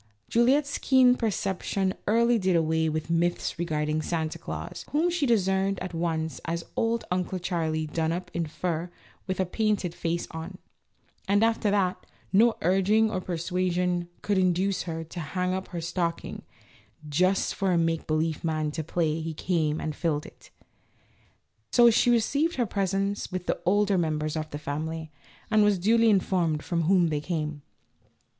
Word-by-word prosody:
Juliette's 275 Hz, +5 st, +2 dB
keen 255 Hz, -2 st, +5 dB
perception 195 Hz, -3 st, -1 dB
early 235 Hz, +2 st, +3 dB
did 185 Hz, -2 st, +2 dB
away 160 Hz, 0 st, +2 dB
with 155 Hz, +1 st, -3 dB
myths 170 Hz, 0 st, 0 dB
regarding 155 Hz, -2 st, -1 dB
Santa 160 Hz, -1 st, -2 dB
Glaus, -, -, -6 dB
whom 330 Hz, +4 st, +1 dB
she 330 Hz, -5 st, 0 dB
discerned 195 Hz, -3 st, +2 dB
at 185 Hz, -1 st, -5 dB
once 160 Hz, -3 st, -2 dB
as 170 Hz, +1 st, -2 dB
"only 230 Hz, 0 st, 0 dB
Uncle 180 Hz, +1 st, -1 dB
Charlie 165 Hz, -3 st, -1 dB
done 160 Hz, +1 st, -1 dB
up 180 Hz, +2 st, -4 dB
in 170 Hz, -2 st, -1 dB
fur 165 Hz, +1 st, -2 dB
and -, -, -13 dB, 0.4 s
with 185 Hz, 0 st, -2 dB
a 190 Hz, -, +2 dB
painted 205 Hz, -2 st, 0 dB
face 170 Hz, 0 st, -2 dB
on," 160 Hz, +3 st, -7 dB, 0.7 s
and, 205 Hz, +2 st, +3 dB
after 225 Hz, -2 st, +2 dB
that, 195 Hz, -3 st, +1 dB, 0.3 s
no 225 Hz, +3 st, +5 dB
urging 195 Hz, +5 st, +3 dB
or 185 Hz, -, -2 dB
persuasion 180 Hz, 0 st, -1 dB
could 205 Hz, -2 st, +1 dB
induce 185 Hz, +1 st, +1 dB
her 165 Hz, 0 st, -3 dB
to 165 Hz, +2 st, -8 dB
hang 180 Hz, +3 st, -2 dB
up 190 Hz, 0 st, -3 dB
her 175 Hz, -, -5 dB
stocking 170 Hz, 0 st, -3 dB, 0.7 s
"just 185 Hz, +6 st, +2 dB
for 195 Hz, -2 st, 0 dB
a 175 Hz, -, +3 dB
make 165 Hz, -1 st, 0 dB
believe 155 Hz, 0 st, 0 dB
man 155 Hz, -2 st, -1 dB
to 160 Hz, +1 st, -4 dB
play 160 Hz, 0 st, -1 dB
he 160 Hz, 0 st, -4 dB
came 160 Hz, -3 st, 0 dB
and 155 Hz, -2 st, -3 dB
filled 150 Hz, -3 st, -1 dB
it." -, -, -15 dB, 1.2 s
So 240 Hz, -1 st, +7 dB
she 235 Hz, -, +3 dB
received 280 Hz, +8 st, +2 dB
her 245 Hz, -, +1 dB
presents 195 Hz, 0 st, -1 dB
with 185 Hz, -1 st, -4 dB
the -, -, -1 dB
older 200 Hz, 0 st, +3 dB
members 155 Hz, -2 st, -1 dB
of 155 Hz, -1 st, -3 dB
the 145 Hz, -, -5 dB
family, 155 Hz, +2 st, -4 dB, 0.4 s
and 215 Hz, -1 st, +5 dB
was 205 Hz, -1 st, +3 dB
duly 225 Hz, +5 st, +4 dB
informed 180 Hz, -6 st, +1 dB
from 170 Hz, -2 st, -1 dB
whom 180 Hz, -1 st, +4 dB
they 150 Hz, -1 st, -1 dB
came. 150 Hz, -3 st, -3 dB
180 Hz, 165 wpm, -27 LUFS, 160-200 Hz, 1.2 s, So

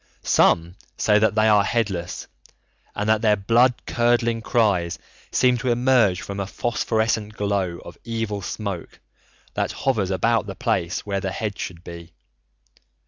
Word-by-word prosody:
Some 85 Hz, +3 st, +2 dB, 0.2 s
say 105 Hz, -1 st, +3 dB
that 110 Hz, 0 st, +2 dB
they 110 Hz, 0 st, +3 dB
are 105 Hz, -2 st, +5 dB
headless, 100 Hz, -6 st, -2 dB, 0.7 s
and 105 Hz, -, -2 dB
that 110 Hz, 0 st, +3 dB
their 105 Hz, -2 st, +4 dB
blood 120 Hz, +5 st, +3 dB
curdling 120 Hz, -1 st, +1 dB
cries 100 Hz, -8 st, +1 dB, 0.3 s
seem 125 Hz, -1 st, +3 dB
to 125 Hz, +1 st, -2 dB
emerge 120 Hz, -6 st, +3 dB
from 100 Hz, 0 st, -6 dB
a 100 Hz, -, -3 dB
phosphorescent 110 Hz, -1 st, -1 dB
glow 100 Hz, -4 st, -1 dB
of -, -, -11 dB
evil 115 Hz, -3 st, -3 dB
smoke 100 Hz, -2 st, -6 dB, 0.5 s
that -, -, -1 dB
hovers 110 Hz, -9 st, -1 dB
about 110 Hz, +3 st, +1 dB
the 95 Hz, -, -6 dB
place 85 Hz, -1 st, -1 dB
where 100 Hz, -1 st, -2 dB
the 95 Hz, -, -3 dB
head 105 Hz, +1 st, -4 dB
should 85 Hz, -1 st, -6 dB
be. 85 Hz, -1 st, -10 dB
105 Hz, 145 wpm, -23 LUFS, 95-115 Hz, 0.7 s, are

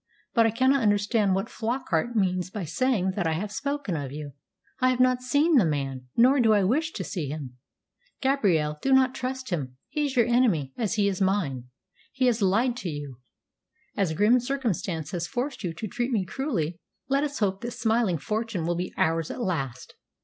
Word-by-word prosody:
But 230 Hz, -1 st, +5 dB
I -, -, +3 dB
cannot 260 Hz, +4 st, +3 dB
understand 205 Hz, -1 st, +2 dB
what 195 Hz, -, -1 dB
Flockart 235 Hz, -3 st, -2 dB
means 185 Hz, -3 st, +1 dB
by 195 Hz, -2 st, -5 dB
saying 190 Hz, -, +1 dB
that 185 Hz, -3 st, -1 dB
I 160 Hz, -, +1 dB
have 200 Hz, +6 st, -3 dB
spoken 280 Hz, -5 st, -2 dB
of 140 Hz, -4 st, -4 dB
you. 145 Hz, 0 st, -6 dB, 0.5 s
I 255 Hz, -, +4 dB
have 255 Hz, -1 st, 0 dB
not 255 Hz, 0 st, +3 dB
seen 290 Hz, +5 st, +3 dB
the 235 Hz, -, +6 dB
man, 135 Hz, -5 st, -2 dB
nor 260 Hz, +4 st, +5 dB
do 225 Hz, -3 st, +5 dB
I 205 Hz, -2 st, +3 dB
wish 305 Hz, -, +1 dB
to -, -, -4 dB
see 165 Hz, -7 st, -4 dB
him. 135 Hz, -4 st, -6 dB, 0.6 s
Gabrielle, 180 Hz, -, +1 dB
do 270 Hz, -, +2 dB
not 260 Hz, -1 st, +4 dB
trust 260 Hz, -2 st, -4 dB
him. 130 Hz, -7 st, -3 dB
He 300 Hz, +2 st, -1 dB
is 275 Hz, -, -5 dB
your 235 Hz, -2 st, +5 dB
enemy, 215 Hz, -, +2 dB
as 225 Hz, -2 st, -1 dB
he 205 Hz, -2 st, +2 dB
is 195 Hz, -1 st, -2 dB
mine. 175 Hz, -11 st, 0 dB, 0.5 s
He 265 Hz, -1 st, 0 dB
has 240 Hz, -3 st, +2 dB
lied 225 Hz, +6 st, +2 dB
to 200 Hz, -8 st, -4 dB
you. 145 Hz, -5 st, -6 dB, 0.8 s
As 190 Hz, -6 st, 0 dB
grim 215 Hz, +9 st, +4 dB
circumstance 205 Hz, -, -2 dB
has 170 Hz, -3 st, -3 dB
forced 260 Hz, 0 st, -3 dB
you 175 Hz, -, -1 dB
to 215 Hz, +6 st, -5 dB
treat 240 Hz, +5 st, -2 dB
me 205 Hz, -6 st, +1 dB
cruelly, 190 Hz, -, -2 dB, 0.3 s
let 275 Hz, +2 st, +2 dB
us 290 Hz, -1 st, -3 dB
hope 195 Hz, -2 st, 0 dB
that 240 Hz, -, -3 dB
smiling 225 Hz, -6 st, +1 dB
fortune 215 Hz, 0 st, -2 dB
will 175 Hz, -, +1 dB
be 180 Hz, +1 st, -3 dB
ours 165 Hz, 0 st, +1 dB
at -, -, -6 dB
last. 135 Hz, -, -3 dB
205 Hz, 200 wpm, -26 LUFS, 165-250 Hz, 0.8 s, the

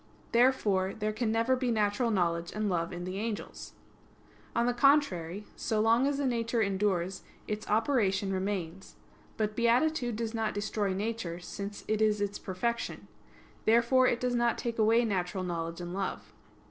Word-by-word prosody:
Therefore 215 Hz, -6 st, +3 dB
there 215 Hz, 0 st, -2 dB
can 220 Hz, 0 st, -1 dB
never 230 Hz, +3 st, +2 dB
be 255 Hz, -1 st, -1 dB
natural 215 Hz, +1 st, +1 dB
knowledge 170 Hz, -4 st, 0 dB
and 215 Hz, 0 st, 0 dB
love 170 Hz, -2 st, -1 dB
in 175 Hz, -1 st, -5 dB
the 185 Hz, +2 st, -4 dB
angels. 220 Hz, -1 st, -5 dB, 0.8 s
On 235 Hz, -, +2 dB
the 245 Hz, -, +2 dB
contrary, 210 Hz, -, +2 dB
So 220 Hz, -2 st, -1 dB
long 230 Hz, +4 st, +4 dB
as 285 Hz, 0 st, -1 dB
a 285 Hz, -, 0 dB
nature 235 Hz, -2 st, 0 dB
endures, 195 Hz, -3 st, 0 dB, 0.3 s
its 210 Hz, 0 st, -4 dB
operation 210 Hz, -4 st, +1 dB
remains. 190 Hz, -2 st, -3 dB, 0.4 s
But 215 Hz, -1 st, -1 dB
beatitude 245 Hz, +2 st, +2 dB
does 225 Hz, 0 st, -3 dB
not 225 Hz, -2 st, -1 dB
destroy 205 Hz, -1 st, -1 dB
nature, 200 Hz, -4 st, -3 dB
since 200 Hz, +3 st, -7 dB
it 215 Hz, 0 st, 0 dB
is 210 Hz, -1 st, +3 dB
its 205 Hz, 0 st, -2 dB
perfection. 235 Hz, +6 st, -3 dB, 0.6 s
Therefore 235 Hz, +3 st, +4 dB
it 240 Hz, -, +1 dB
does 250 Hz, -1 st, 0 dB
not 240 Hz, -1 st, +2 dB
take 235 Hz, -1 st, -3 dB
away 225 Hz, +2 st, +4 dB
natural 185 Hz, -3 st, -1 dB
knowledge 165 Hz, -1 st, -3 dB
and 175 Hz, 0 st, -6 dB
love. 195 Hz, 0 st, -4 dB
215 Hz, 160 wpm, -30 LUFS, 190-235 Hz, 0.8 s, long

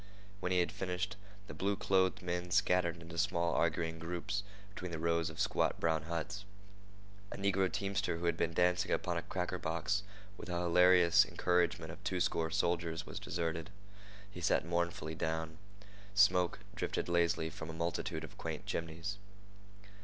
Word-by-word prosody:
When 90 Hz, -2 st, -2 dB
he 90 Hz, -1 st, +4 dB
had 85 Hz, -, 0 dB
finished, 90 Hz, -1 st, -2 dB, 0.3 s
the -, -, -8 dB
blue 100 Hz, +1 st, 0 dB
clothed 95 Hz, -1 st, +2 dB
men 90 Hz, 0 st, -2 dB
scattered 90 Hz, -3 st, +2 dB
into 85 Hz, 0 st, -6 dB
small 85 Hz, -2 st, +1 dB
arguing 80 Hz, 0 st, 0 dB
groups 85 Hz, +4 st, -2 dB, 0.3 s
between 90 Hz, -2 st, -5 dB
the 85 Hz, -, -3 dB
rows 85 Hz, 0 st, +1 dB
of -, -, -10 dB
squat -, -, +1 dB
brown 80 Hz, -2 st, +1 dB
huts. 85 Hz, +4 st, -3 dB, 0.9 s
A -, -, -5 dB
negro 95 Hz, -1 st, +2 dB
teamster 100 Hz, -3 st, -1 dB
who 85 Hz, -, -4 dB
had 85 Hz, -1 st, +2 dB
been 85 Hz, 0 st, 0 dB
dancing 90 Hz, 0 st, +3 dB
upon -, -, 0 dB
a -, -, 0 dB
cracker 90 Hz, -1 st, -3 dB
box 85 Hz, +4 st, 0 dB, 0.4 s
with -, -, -8 dB
the 90 Hz, -, -1 dB
hilarious 90 Hz, 0 st, +6 dB
encouragement 85 Hz, -2 st, +1 dB
of 90 Hz, +4 st, -12 dB
twoscore 90 Hz, -3 st, 0 dB
soldiers 85 Hz, -1 st, 0 dB
was -, -, -6 dB
deserted. 80 Hz, 0 st, -2 dB, 0.6 s
He 90 Hz, -, -8 dB
sat 80 Hz, -, +2 dB
mournfully 85 Hz, -2 st, -1 dB
down. 80 Hz, 0 st, -3 dB, 0.6 s
Smoke 95 Hz, -1 st, +4 dB
drifted -, -, -2 dB
lazily 85 Hz, -1 st, +2 dB
from 80 Hz, -, -7 dB
a -, -, -5 dB
multitude 85 Hz, 0 st, -2 dB
of 80 Hz, -, -10 dB
quaint -, -, -4 dB
chimneys. 85 Hz, +5 st, -3 dB
85 Hz, 160 wpm, -34 LUFS, 80-90 Hz, 0.9 s, hilarious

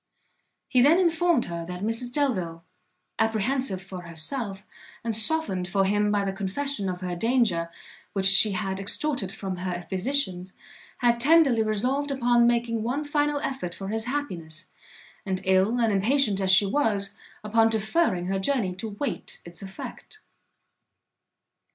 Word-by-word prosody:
He 250 Hz, -, +3 dB
then 295 Hz, +6 st, +6 dB
informed 340 Hz, -5 st, +2 dB
her 170 Hz, -1 st, -5 dB
that 180 Hz, +1 st, -6 dB
Mrs 230 Hz, +3 st, -1 dB
Delvile, 185 Hz, -, -1 dB, 0.6 s
apprehensive 225 Hz, -2 st, 0 dB
for 190 Hz, -1 st, -8 dB
herself, 195 Hz, -, -2 dB, 0.4 s
and 230 Hz, -1 st, -1 dB
softened 220 Hz, -, +2 dB
for 195 Hz, +1 st, +1 dB
him 205 Hz, +1 st, +1 dB
by 205 Hz, -1 st, +1 dB
the 195 Hz, -, -2 dB
confession 200 Hz, +3 st, -2 dB
of 180 Hz, 0 st, -5 dB
her 180 Hz, -1 st, -3 dB
danger, 210 Hz, -5 st, +1 dB, 0.4 s
which 195 Hz, -1 st, 0 dB
she 195 Hz, +2 st, +6 dB
had 190 Hz, 0 st, -3 dB
extorted 205 Hz, +1 st, 0 dB
from 195 Hz, -3 st, -5 dB
her 180 Hz, -1 st, -4 dB
physicians, 190 Hz, -2 st, -2 dB, 0.5 s
had 240 Hz, -1 st, +3 dB
tenderly 280 Hz, -3 st, +5 dB
resolved 250 Hz, +7 st, 0 dB
upon 240 Hz, -3 st, +3 dB
making 235 Hz, -1 st, 0 dB
one 260 Hz, +7 st, -2 dB
final 290 Hz, 0 st, 0 dB
effort 220 Hz, -13 st, -4 dB
for 195 Hz, 0 st, -6 dB
his 220 Hz, +1 st, -2 dB
happiness, 180 Hz, -, -4 dB, 0.5 s
and 190 Hz, -1 st, -2 dB
ill 190 Hz, +5 st, +2 dB
and 225 Hz, -3 st, +2 dB
impatient 210 Hz, 0 st, +2 dB
as 190 Hz, -, +1 dB
she 190 Hz, +2 st, +6 dB
was, 200 Hz, -4 st, 0 dB, 0.3 s
upon 225 Hz, +1 st, +3 dB
deferring 220 Hz, -, 0 dB
her 195 Hz, +1 st, -1 dB
journey 200 Hz, -3 st, 0 dB
to 195 Hz, +5 st, -5 dB
wait 210 Hz, +7 st, -5 dB
its 170 Hz, 0 st, -10 dB
effect. 195 Hz, -, -9 dB
215 Hz, 145 wpm, -26 LUFS, 190-255 Hz, 0.6 s, then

